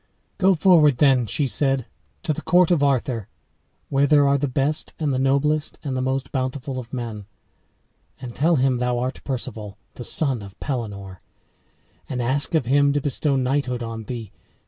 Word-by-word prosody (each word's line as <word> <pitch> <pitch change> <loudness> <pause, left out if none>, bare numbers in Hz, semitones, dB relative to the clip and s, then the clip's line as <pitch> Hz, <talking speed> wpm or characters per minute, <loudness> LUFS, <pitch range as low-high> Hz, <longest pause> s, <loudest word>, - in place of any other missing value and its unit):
"Go 190 -1 +4
forward, 155 -6 +5
then," 130 -4 +4
she 140 +8 0
said, 135 +1 +1 0.4
"to 160 - 0
the - - -6
court 180 -1 +3
of 170 -5 +3
Arthur, 130 -6 0 0.6
where 140 +1 +2
there 145 -1 +5
are 140 0 +3
the 145 - 0
best 140 +4 -1
and 150 -4 -1
the 130 - 0
noblest 145 +3 +1
and 140 -4 -3
the 130 - -1
most 130 +1 -2
bountiful 130 0 -3
of 120 -1 -10
men, 115 -5 -5 0.9
and 125 -2 -7
tell 165 +7 +2
him 130 -2 +2
thou 125 0 0
art 125 +2 -3
Perceval, 110 -6 -5 0.2
the 120 - -8
son 135 -3 +1
of 100 -1 -12
Pelenore, 100 - -5 0.9
and 125 - -3
ask 135 +7 0
of 155 - +2
him 140 +3 +3
to 145 - +1
bestow 145 0 0
knighthood 130 -2 -1
on 115 -1 -6
thee. 115 -4 -6
135 Hz, 175 wpm, -23 LUFS, 120-145 Hz, 0.9 s, forward